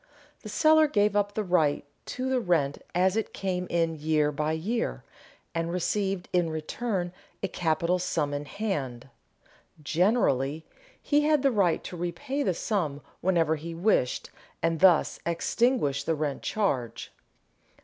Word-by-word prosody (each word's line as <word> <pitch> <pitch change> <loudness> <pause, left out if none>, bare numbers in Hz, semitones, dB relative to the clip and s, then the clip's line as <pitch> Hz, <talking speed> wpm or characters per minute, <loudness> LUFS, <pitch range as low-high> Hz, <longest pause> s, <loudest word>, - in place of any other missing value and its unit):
The - - -8
seller 315 0 +5
gave 205 -6 +2
up 205 0 +1
the 215 - 0
right 160 -7 +2 0.2
to 255 +1 -3
the 260 -1 +2
rent 160 - 0
as 185 +2 +3
it 220 - -2
came 180 -2 -2
in 165 -1 +1
year 150 -1 +2
by 150 +2 -1
year, 215 +9 -2 0.5
and 165 0 -1
received 190 +1 -1
in 175 -2 +2
return 175 +3 -3 0.3
a - - +2
capital 170 +1 0
sum 155 -5 -1
in 145 +1 -3
hand. 135 - -4 0.7
Generally 160 - +1 0.3
he 290 0 +2
had 300 -2 +3
the 275 - +4
right 195 -7 +2
to - - -7
repay 220 +12 -3
the 185 -11 +1
sum 160 -9 -1 0.2
whenever 165 -4 +2
he 165 +2 -7
wished 170 - +1 0.3
and 165 -1 +1
thus 180 -4 +4
extinguish 170 - +1
the 165 +2 0
rent 145 -2 -2
charge. 140 - -2
175 Hz, 145 wpm, -27 LUFS, 155-205 Hz, 0.7 s, seller